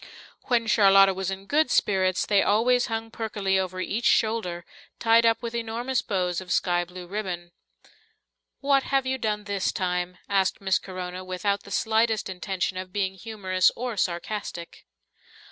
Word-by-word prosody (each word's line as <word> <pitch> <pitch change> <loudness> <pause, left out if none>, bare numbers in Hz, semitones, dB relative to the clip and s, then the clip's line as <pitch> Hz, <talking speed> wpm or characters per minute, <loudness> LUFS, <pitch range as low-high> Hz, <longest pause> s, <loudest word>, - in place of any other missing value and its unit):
When 235 -2 +2
Charlotta 195 -3 +6
was 190 0 -3
in 195 0 -5
good 295 +5 +2
spirits, 185 -5 +2
they 200 -2 +3
always 245 +4 +3
hung 225 0 -4
perkily 205 -4 -1
over 185 0 -3
each 230 +6 -1
shoulder, 215 -9 +1 0.3
tied 230 0 +4
up 225 +1 +1
with 235 0 -4
enormous 235 +2 -2
bows 180 -4 -1
of 180 -1 -9
sky 175 +1 +2
blue 180 +1 -10
ribbon. 180 -3 -5 1.1
"What 275 -1 +3
have 270 0 0
you 260 0 -1
done 210 -2 -1
this 200 -2 -1
time?" 180 -1 -2
asked 195 -2 +1
Miss 190 -1 +1
Corona, 185 -1 -6
without 185 +2 -1
the - - -14
slightest 220 -1 +1
intention 185 0 -3
of 185 0 -6
being 190 -1 -1
humorous 190 -3 +1
or 245 -1 -4
sarcastic. 175 -1 -4
200 Hz, 155 wpm, -26 LUFS, 185-225 Hz, 1.1 s, Charlotta